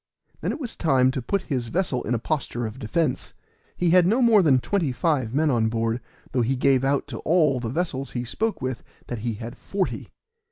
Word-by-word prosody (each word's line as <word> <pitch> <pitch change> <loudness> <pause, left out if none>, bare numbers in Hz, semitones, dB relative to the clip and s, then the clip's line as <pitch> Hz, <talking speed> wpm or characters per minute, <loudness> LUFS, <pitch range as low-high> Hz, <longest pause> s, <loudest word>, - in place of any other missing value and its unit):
Then - - -1
it - - -5
was 250 -6 -5
time 130 -5 +3
to 130 - -3
put 195 - -1
his 125 -5 -2
vessel 145 -2 0
in 120 - -1
a - - +1
posture 120 -2 -2
of 110 +3 -6
defense. 155 +7 -1 0.4
He 175 -2 +2
had 180 -1 +6
no 225 +6 +3
more 230 -5 +6
than 145 -7 +5
twenty 165 +2 0
five 130 -2 0
men 150 +3 +2
on 115 -3 +2
board, 115 +1 -1 0.3
though 125 - +1
he 125 +3 +1
gave 135 0 +3
out 140 +1 +1
to 115 - -6
all 155 -6 +3
the 120 -2 -3
vessels 135 -2 -2
he 120 - -2
spoke 175 - -2
with 130 -2 -3 0.2
that 120 - -5
he 115 0 -2
had 115 +2 -7
forty. 195 -1 -3
135 Hz, 215 wpm, -24 LUFS, 120-170 Hz, 0.4 s, had